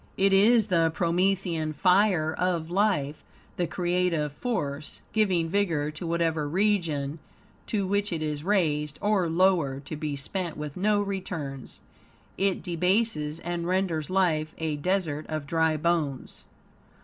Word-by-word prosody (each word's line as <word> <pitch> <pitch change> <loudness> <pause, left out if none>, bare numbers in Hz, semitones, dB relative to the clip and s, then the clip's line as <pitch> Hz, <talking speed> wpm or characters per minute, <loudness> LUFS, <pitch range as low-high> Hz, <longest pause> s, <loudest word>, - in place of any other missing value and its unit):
It 195 0 +3
is 215 +3 +5
the 170 -5 +2
promethian 170 -2 0
fire 180 -2 +3
of 170 -2 -1
life, 180 -7 0 0.3
the 175 - 0
creative 175 -4 0
force, 150 - -3
giving 190 -6 +2
vigor 165 -6 0
to 155 +3 -6
whatever 165 -3 0
region 165 -6 0 0.5
to 205 -3 0
which 205 +1 0
it 160 -2 -2
is 150 -1 -3
raised; 155 -6 +1
or, 205 -5 +1
lowered, 165 -6 +2
to 155 - -5
be 150 -1 -3
spent 170 +5 -4
with 150 -1 -6
no 205 +2 +2
returns, 170 -9 -5 0.5
it 195 -1 0
debases 175 -3 0
and 175 0 -3
renders 180 -4 0
life 165 -5 +1
a 160 -2 -2
desert 155 -1 -1
of 155 -2 -3
dry 160 0 +1
bones. 155 -4 -2
170 Hz, 135 wpm, -27 LUFS, 155-190 Hz, 0.5 s, is